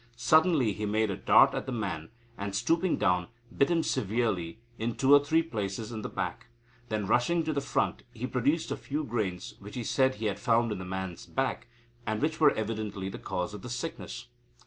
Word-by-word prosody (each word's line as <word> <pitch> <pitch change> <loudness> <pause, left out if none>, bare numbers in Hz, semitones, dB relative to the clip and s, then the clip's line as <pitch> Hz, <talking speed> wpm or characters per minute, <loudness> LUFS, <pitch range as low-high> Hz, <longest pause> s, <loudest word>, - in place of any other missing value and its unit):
Suddenly 135 - +4
he 105 +1 -3
made 110 0 +1
a - - -2
dart - - +6
at - - -3
the - - -2
man, 100 -9 -3 0.3
and, 100 -2 -4
stooping 170 - +2
down, 90 -1 +2 0.3
bit 140 - +3
him 170 -2 +2
severely 100 -6 -1 0.2
in 115 +1 -1
two 135 +1 +4
or 145 0 +8
three 160 +3 +3
places 110 -6 -4
in 110 -2 -4
the - - -4
back. - - -4 0.4
Then, 105 -2 -1
rushing 125 - +2
to 155 0 -1
the 140 - 0
front, - - 0
he 120 0 -5
produced 135 +6 0
a - - -1
few 150 +2 -3
grains, 105 -8 -3
which 105 +1 -10
he 125 - -3
said 130 +3 +2
he 110 - -5
had 100 -1 -1
found 115 +2 +2
in 105 - -3
the 95 - -6
man's 95 -1 -5
back, 135 -1 -2 0.4
and 110 -1 -1
which 155 +1 0
were 155 -2 +7
evidently 105 -3 -3
the - - -7
cause 90 +3 -3
of 105 - -7
the 125 - -7
sickness." 120 -1 -5
115 Hz, 210 wpm, -29 LUFS, 100-140 Hz, 0.4 s, or